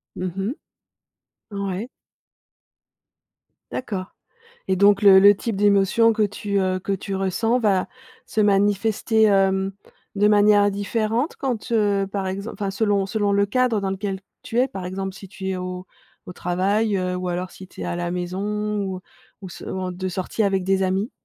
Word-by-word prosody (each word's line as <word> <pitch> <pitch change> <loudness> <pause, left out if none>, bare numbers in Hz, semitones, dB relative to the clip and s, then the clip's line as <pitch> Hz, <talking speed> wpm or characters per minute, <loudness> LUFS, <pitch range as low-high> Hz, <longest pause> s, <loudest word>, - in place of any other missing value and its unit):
Mmh 185 0 -3
mh. 195 +6 -1 1.0
Ouais. 200 +2 -3 1.8
D'accord 195 -7 -5 0.6
et 190 - +2
donc 200 +2 +4
le 195 -2 +8
le 200 +1 +8
type 225 +1 -3
d'émotion 205 +3 +4
que 215 - +1
tu, 205 0 -1
heu, 185 -1 +1
que 200 - -3
tu 195 +1 -3
ressens 210 +5 +1
va 200 -6 +2 0.4
se 220 - -1
manifester, 205 +2 +2
hem, 195 -1 +2 0.4
de 205 +1 +3
manière 205 -1 +5
différente 220 +6 -1
quand, 250 -6 -3
heu, 205 -3 +2
par 195 -1 -2
exem 200 +4 -4
enfin 200 -2 -3
selon 200 -1 +1
selon 205 0 0
le 200 0 +3
cadre 240 0 +1
dans 195 - -1
lequel 195 0 -3 0.2
tu 230 - -3
es, 255 +2 +3
par 190 -8 -6
exemple 190 +1 -4
si 195 - -11
tu 190 0 -6
es 190 - -2
au 180 0 -5 0.4
au - - -7
travail, 195 +5 0
heu, 185 -1 -1
ou 180 0 -3
alors 180 +1 -3
si 190 - -12
tu - - -9
es - - -3
à 175 - -3
la 175 0 -2
maison 205 +4 -2
ou 190 -1 -4 0.4
ou 190 - -7
s 175 - -11
en 185 -1 -3
de 185 +1 -4
sortie 185 +4 -2
avec 195 -2 +1
des 195 0 +1
amis? 190 +5 0
195 Hz, 175 wpm, -23 LUFS, 190-210 Hz, 1.8 s, le